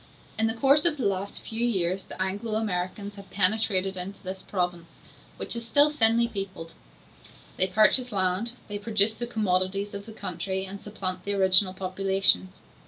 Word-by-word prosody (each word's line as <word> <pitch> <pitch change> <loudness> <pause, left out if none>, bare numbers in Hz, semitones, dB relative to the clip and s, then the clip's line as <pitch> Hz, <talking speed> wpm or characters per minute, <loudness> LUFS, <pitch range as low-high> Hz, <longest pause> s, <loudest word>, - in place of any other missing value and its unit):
In 225 - +3
the 225 - -2
course 275 +5 +4
of 320 -3 +2
the 265 - -2
last 195 0 -2
few 225 +1 -3
years 190 -5 0
the - - -11
Anglo 200 +4 -2
Americans 200 -1 -3
have 195 -1 -12
penetrated 195 -1 +1
into 185 +2 -6
this 190 0 -6
province, 175 -4 -4 0.4
which - - -5
is 235 - -5
still 290 +6 +4
thinly 235 -4 +4
peopled; 195 -6 -7 0.8
they 185 - +2
purchase 220 +6 +4
land, 190 +4 0
they 205 -1 -5
produce 210 0 +2
the 240 +2 -4
commodities 195 -2 -1
of 200 +1 -7
the - - -8
country, 190 0 -4
and 195 +1 -8
supplant 185 -3 -4
the 200 +1 -1
original 190 0 +4
population. 190 - +2
195 Hz, 170 wpm, -26 LUFS, 185-220 Hz, 0.8 s, course